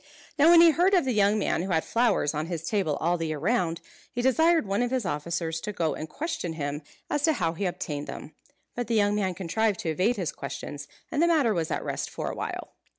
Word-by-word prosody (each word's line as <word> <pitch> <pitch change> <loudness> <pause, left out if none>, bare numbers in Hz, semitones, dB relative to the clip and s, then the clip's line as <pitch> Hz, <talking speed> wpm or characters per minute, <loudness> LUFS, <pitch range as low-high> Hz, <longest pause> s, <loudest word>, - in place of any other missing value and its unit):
Now 305 +3 +7
when 340 -1 +8
he 335 -1 +8
heard 360 +6 +3
of 350 - +3
the 255 - 0
young 205 0 +3
man 195 - 0
who 190 - -4
had 160 -3 +1
flowers 230 -10 +1
on 155 +1 -2
his 165 -2 -4
table 180 -4 0
all 175 +2 +1
the 165 - -1
year 155 -1 -3
round, 170 -1 0 0.3
he 245 - -3
desired 320 +3 +4
one 200 +3 0
of 245 - +1
his 255 -4 -1
officers 165 0 -2
to 210 - -4
go 165 -6 -1
and 155 - -6
question 320 - -4
him 145 -1 -4 0.3
as 295 - -1
to 315 +2 +3
how 165 - -1
he 190 +3 -2
obtained 150 -4 -4
them. 155 - -8 0.4
But 245 -2 -3
the 230 - 0
young 205 -1 +3
man 190 -3 0
contrived 200 +3 0
to 165 - -2
evade 185 +10 +1
his - - -2
questions, - - -7 0.2
and 295 - 0
the 340 - +5
matter 295 -10 +3
was 165 -4 -1
at - - -2
rest - - -3
for - - -4
a - - -7
while. - - -5
200 Hz, 245 wpm, -27 LUFS, 165-245 Hz, 0.4 s, when